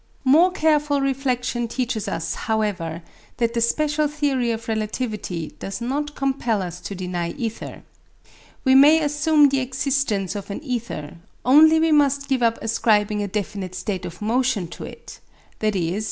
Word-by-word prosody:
More 315 +8 +6
careful 300 -4 +2
reflection 255 -3 -1
teaches 235 -3 -3
us, 165 - -2 0.2
however, 185 -7 -1 0.3
that 235 -1 0
the 235 - 0
special 300 +5 +1
theory 285 -5 0
of 225 0 -3
relativity 215 -7 -3
does 195 +2 -5
not 290 +5 -3
compel 255 -7 0
us 175 -1 -6
to 195 +3 -6
deny 180 -2 -3
ether. 225 -2 -6 0.8
We 260 - +4
may 290 +4 +7
assume 295 0 +4
the 275 0 +1
existence 255 -7 -1
of 200 0 -6
an 200 +9 -6
ether; 235 - -5 0.3
only 315 +5 +7
we 325 0 +2
must 280 -2 +3
give 265 -2 +1
up 230 -1 +2
ascribing 210 -2 +1
a 205 - -2
definite 195 -2 -4
state 190 -4 -3
of 175 +4 -8
motion 230 -5 0
to - - -8
it, - - -11 0.4
i.e. 195 -3 0
235 Hz, 155 wpm, -22 LUFS, 205-280 Hz, 0.8 s, may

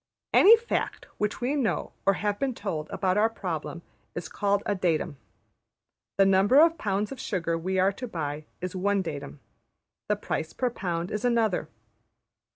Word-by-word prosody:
Any 450 +3 +8
fact 465 +1 -3
which 210 +3 -1
we 250 +4 0
know 260 -7 -1
or 195 - +6
have 205 +1 -2
been 265 -3 -1
told 160 -9 -4
about 185 +1 0
our 220 +1 +4
problem 170 -5 -5 0.3
is 175 - -5
called 200 0 0
a 205 - +1
datum. 170 -5 -1 1.0
The 195 - +6
number 195 +7 +5
of 330 0 +5
pounds 205 +2 -1
of 270 - -7
sugar 170 -5 -1
we 185 +3 -2
are 190 +1 +4
to 250 +5 -6
buy 155 -6 -4 0.2
is 180 +1 -4
one 200 +1 +1
datum; 145 -3 -6 0.7
the - - +3
price 160 - -4
per 250 -1 -1
pound 175 -4 -3
is 210 - -3
another. 225 -9 +1
195 Hz, 165 wpm, -27 LUFS, 170-220 Hz, 1.0 s, Any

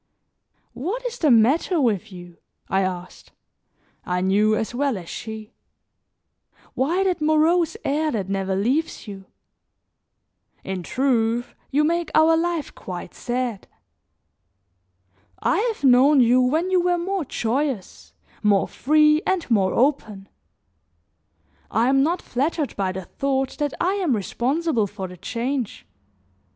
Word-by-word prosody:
"What 375 - -4
is 480 - -4
the 310 - +3
matter 270 - +3
with 220 - 0
you?" 175 -2 -11 0.3
I 190 - +2
asked; 185 -1 -5 0.7
I 180 0 -1
knew 205 +3 +3
as 220 +2 -3
well 270 -2 0
as 175 -3 -9
she. 220 +3 -7 1.2
"Why 335 +9 +1
that 370 -4 0
morose 315 +2 +2
air 305 +3 +1
that 210 -8 -2
never 195 -1 -1
leaves 255 +9 -1
you? 195 -2 -9 1.4
In 190 -1 -4
truth, 240 +1 0 0.2
you 290 +2 +2
make 340 +2 0
our 320 +1 +5
life 335 -2 -2
quite 175 -1 -8
sad. 240 -4 -3 1.7
I - - +1
have 420 - -12
known 270 +2 +6
you 250 +1 +5
when 315 +9 +1
you 365 -1 +4
were 355 0 +1
more 370 +1 -2
joyous, 250 -3 -3 0.3
more 205 -2 +3
free 305 +2 +3
and 375 -3 0
more 195 -4 +2
open; 220 -7 0 1.4
I 230 +3 +2
am 270 0 +4
not 335 +6 0
flattered 285 +3 -2
by 190 -2 -1
the 185 -1 -6
thought 270 +2 -2
that 290 -2 -1
I 365 +3 +1
am 305 -10 +1
responsible 245 - -1
for 195 -1 -6
the 180 0 -11
change. 235 - -3
255 Hz, 130 wpm, -23 LUFS, 205-310 Hz, 1.7 s, known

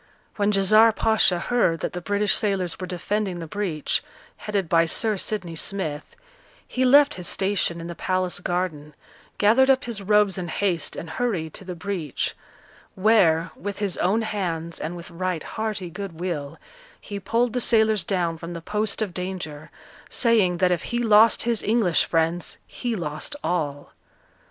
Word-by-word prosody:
When 205 0 +2
Djezzar 215 +3 +5
Pacha 220 -5 +3
heard 175 -6 +1
that - - -3
the 180 - -4
British 205 +2 +1
sailors 195 -5 0
were 185 - -5
defending 190 +2 -2
the 170 - -6
breach, 165 -3 -2 0.3
headed 200 -4 -2
by 165 0 +3
Sir 215 +5 +1
Sidney 185 -4 -3
Smith, 160 - -4 0.5
he 255 - -1
left 285 +3 +6
his 175 - -4
station 190 -3 0
in 165 - -7
the 170 - -5
palace 185 0 -1
garden, 175 -5 -3 0.4
gathered 235 +6 +4
up 265 -1 +4
his 230 -4 -5
robes 205 -1 +3
in 175 - -4
haste, 175 -1 -1
and 165 - -6
hurried 165 -5 -2
to - - -7
the 180 -1 -6
breach; 170 -5 -3 0.6
where, 185 -5 +3
with 200 0 -5
his 200 -4 -1
own 215 +5 +2
hands, 170 -6 -3
and 165 +3 -4
with 170 0 -10
right 180 -1 -2
hearty 215 -5 -4
good 195 -3 -7
will, 160 -6 -4 0.4
he 200 -1 -6
pulled 230 +4 0
the 250 - 0
sailors 220 -3 +4
down 170 -4 -1
from 170 +1 -7
the 170 - -5
post 210 +5 -1
of 195 -5 -5
danger, 180 -5 -5 0.4
saying 215 -8 +2
that 180 0 +3
if 175 -3 -1
he 240 - -2
lost 225 -1 +5
his 235 -2 0
English 210 -6 +2
friends 165 +1 -1
he 240 -2 -4
lost 155 - -4
all! 150 -5 -2
185 Hz, 165 wpm, -24 LUFS, 170-215 Hz, 0.6 s, left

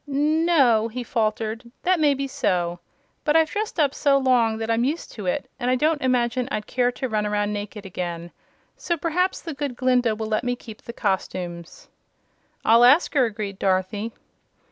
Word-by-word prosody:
"N 305 +4 +1
o!" 240 -9 +4
he 245 +2 -5
faltered; 225 0 -2
"that 365 -1 +2
may 295 -2 +4
be 275 +1 -3
so. 175 -8 -1 0.4
But 300 - +1
I've 320 -1 +4
dressed 420 -4 -3
up 285 -3 +3
so 280 -1 +3
long 245 -4 +2
that 225 0 -2
I'm 230 +1 +2
used 295 +6 -2
to 210 -5 -7
it, 180 - -1
and 245 - -1
I 255 - +3
don't 305 +3 +1
imagine 250 -1 +1
I'd 210 -5 -3
care 245 -1 +1
to 260 - -3
run 215 -3 -1
around 205 0 0
naked 205 0 -6
again. 175 -2 -5 0.4
So 340 - -2
perhaps 350 +4 -1
the 330 - -5
Good 285 -3 -4
Glinda 250 -3 +2
will 220 +1 -4
let 215 +1 -1
me 245 0 0
keep 225 -3 -12
the - - -8
costumes." 180 -4 -4 0.8
"I'll 230 +2 +6
ask 280 +8 +5
her," 270 -4 +4
agreed 205 -3 -5
Dorothy. 195 +3 0
240 Hz, 190 wpm, -23 LUFS, 210-275 Hz, 0.8 s, I'll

